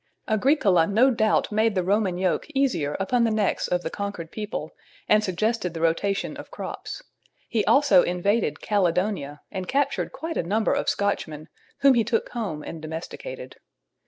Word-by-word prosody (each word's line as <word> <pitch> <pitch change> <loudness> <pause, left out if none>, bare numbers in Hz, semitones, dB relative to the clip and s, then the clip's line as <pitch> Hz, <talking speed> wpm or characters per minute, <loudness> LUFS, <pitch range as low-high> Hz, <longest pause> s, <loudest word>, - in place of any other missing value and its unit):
Agricola 215 - +3
no 235 +7 +4
doubt 220 -3 +1
made 215 0 +2
the 185 - +1
Roman 195 -1 +1
yoke 185 -1 0
easier 175 - +1
upon 235 +5 +1
the 230 - +3
necks 215 -2 0
of 180 0 0
the 160 - -3
conquered 200 -5 -5
people, 215 0 -5 0.4
and 215 0 +4
suggested 195 -1 -1
the 165 - -4
rotation 180 +5 0
of - - -9
crops. - - -7 0.4
He 225 -3 0
also 275 -10 +6
invaded 180 -2 0
Caledonia 180 -6 0
and 185 -1 -4
captured 280 +2 0
quite 325 0 -5
a - - +2
number 210 +6 +1
of - - 0
Scotchmen, 155 -6 -2 0.3
whom 275 -1 +7
he 235 -2 +3
took 225 +1 -1
home 190 -11 -4
and 165 - -7
domesticated. 175 - -7
200 Hz, 160 wpm, -25 LUFS, 175-225 Hz, 0.4 s, whom